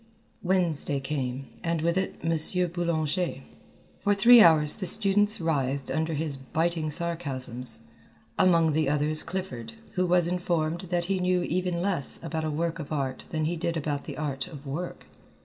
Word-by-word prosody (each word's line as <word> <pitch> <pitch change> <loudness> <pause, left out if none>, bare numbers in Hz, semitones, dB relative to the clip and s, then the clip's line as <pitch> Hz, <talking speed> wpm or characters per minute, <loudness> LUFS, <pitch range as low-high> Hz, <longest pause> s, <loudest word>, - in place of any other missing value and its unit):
Wednesday 175 -6 0
came, 135 -1 -4 0.2
and 165 -2 -1
with 170 +1 +1
it 190 0 -1
M. 165 +2 +3
Boulanger. 170 0 -2 0.6
For 205 0 +1
three 235 +4 +8
hours 155 -5 +5
the 190 -4 -3
students 205 +1 +4
writhed 140 -5 -1
under 160 0 -1
his 150 -2 -1
biting 160 +4 -2
sarcasms, 130 -8 -2 0.5
among 170 -3 +3
the 155 -1 +1
others 150 +1 +1
Clifford, 125 -12 -5 0.2
who 185 -1 0
was 175 -1 +3
informed 170 -2 -1
that 175 -1 0
he 190 +1 -1
knew 180 -1 +1
even 180 0 -1
less 185 -8 -1
about 160 -1 -3
a - - -1
work 165 +2 -2
of 150 -1 -7
art 135 -3 -3
than 155 -1 -2
he 170 +3 -1
did 170 0 -2
about 145 -2 -3
the - - -7
art 140 -3 -3
of 145 -3 -11
work. 160 +6 -6
165 Hz, 165 wpm, -27 LUFS, 145-180 Hz, 0.6 s, three